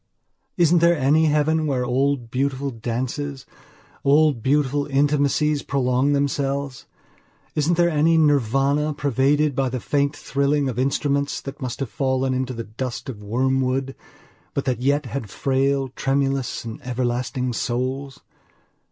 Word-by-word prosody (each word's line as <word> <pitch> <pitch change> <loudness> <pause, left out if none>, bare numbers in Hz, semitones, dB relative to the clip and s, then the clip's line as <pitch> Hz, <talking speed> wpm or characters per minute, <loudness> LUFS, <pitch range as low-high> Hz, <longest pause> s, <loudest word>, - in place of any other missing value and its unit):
Isn't 170 0 +4
there 170 0 +4
any 150 +4 +3
heaven 155 +1 +2
where 130 -3 0
old 130 -1 0
beautiful 135 +1 -1
dances, 130 +4 -4 0.6
old 145 -3 +4
beautiful 145 +2 +1
intimacies 145 +1 +2
prolong 135 +1 +1
themselves? 140 -1 -1 0.7
Isn't 155 +3 +1
there 175 0 +4
any 165 0 +3
Nirvana 145 +1 +2
pervaded 145 +2 +2
by 135 -1 +1
the 130 +1 -3
faint 140 +3 0
thrilling 140 0 0
of 125 -2 -3
instruments 140 +1 0
that 140 +1 -8
have 130 -1 -4
fallen 130 -1 0
into 130 0 -2
the 115 - -4
dust 120 +4 -5
of 110 -5 -7
wormwood 130 +4 0 0.6
but 140 - -1
that 125 -3 -1
yet 140 +2 +1
had 120 -3 -5
frail, 135 +3 0
tremulous, 135 -1 -1
and 115 -1 -7
everlasting 125 0 -2
souls? 130 +3 -3
135 Hz, 130 wpm, -22 LUFS, 130-145 Hz, 0.7 s, Isn't